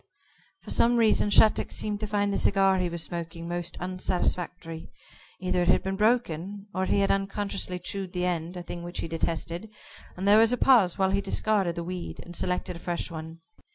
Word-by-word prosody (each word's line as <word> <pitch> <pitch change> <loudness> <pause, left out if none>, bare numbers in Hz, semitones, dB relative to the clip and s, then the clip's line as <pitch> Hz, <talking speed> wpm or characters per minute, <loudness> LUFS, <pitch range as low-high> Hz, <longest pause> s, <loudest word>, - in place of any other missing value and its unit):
For - - -6
some 240 +1 +4
reason 220 -2 +3
Shattuck 215 +1 +4
seemed 210 -1 -3
to 215 - -3
find 205 -1 0
the - - +1
cigar 195 -1 +3
he 180 -1 0
was 170 -1 -3
smoking 170 0 -6
most 175 0 -3
unsatisfactory. 180 -2 -2 0.5
Either 185 -1 0
it 175 - 0
had - - +4
been 190 0 -2
broken, 205 -3 0
or 185 0 0
he 200 - +2
had 195 - +2
unconsciously 195 -1 -1
chewed 190 0 -4
the 180 -1 -1
end 175 0 -2
a 175 - -6
thing 175 0 -7
which 175 +1 -5
he - - -4
detested 165 +4 -3 0.5
and 190 +2 -2
there 210 +2 +7
was 225 +1 +5
a 250 - +1
pause 230 -11 +4
while 190 -1 +2
he 200 +1 +1
discarded 200 -5 +1
the 170 - -4
weed, 180 0 -6
and 175 - -10
selected 180 0 -1
a - - -9
fresh 175 0 -3
one. 160 0 -8
185 Hz, 200 wpm, -27 LUFS, 170-200 Hz, 0.5 s, there